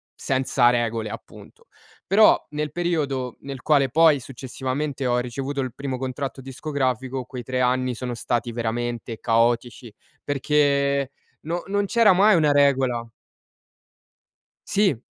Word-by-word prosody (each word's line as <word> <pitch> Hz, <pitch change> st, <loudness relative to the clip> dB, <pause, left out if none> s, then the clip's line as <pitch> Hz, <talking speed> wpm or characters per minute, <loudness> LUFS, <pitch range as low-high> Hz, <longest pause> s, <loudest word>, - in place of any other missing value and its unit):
senza 130 Hz, -2 st, +2 dB
regole 115 Hz, -2 st, -1 dB
appunto. -, -, -12 dB, 0.4 s
Però 210 Hz, +3 st, +5 dB
nel 150 Hz, 0 st, -3 dB
periodo 145 Hz, -8 st, -2 dB
nel 135 Hz, -3 st, -7 dB
quale 140 Hz, -4 st, +3 dB
poi 155 Hz, 0 st, +5 dB
successivamente 130 Hz, +2 st, -4 dB
ho 120 Hz, 0 st, +2 dB
ricevuto 135 Hz, +3 st, -4 dB
il 130 Hz, -3 st, -4 dB
primo 135 Hz, -1 st, -4 dB
contratto 135 Hz, +1 st, -4 dB
discografico, 130 Hz, -2 st, -3 dB
quei 125 Hz, -2 st, -7 dB
3 130 Hz, +2 st, -3 dB
anni 125 Hz, 0 st, +1 dB
sono 125 Hz, 0 st, -4 dB
stati 120 Hz, +1 st, -2 dB
veramente 120 Hz, 0 st, -3 dB
caotici, 115 Hz, 0 st, 0 dB, 0.3 s
perché 140 Hz, -1 st, +1 dB, 0.3 s
non 170 Hz, +3 st, -3 dB
non 205 Hz, 0 st, 0 dB
c'era 225 Hz, -2 st, +4 dB
mai 205 Hz, +2 st, +5 dB
una 150 Hz, -3 st, +3 dB
regola 130 Hz, -4 st, +2 dB, 1.6 s
Sì. 195 Hz, -, +2 dB
130 Hz, 125 wpm, -23 LUFS, 125-145 Hz, 1.6 s, Però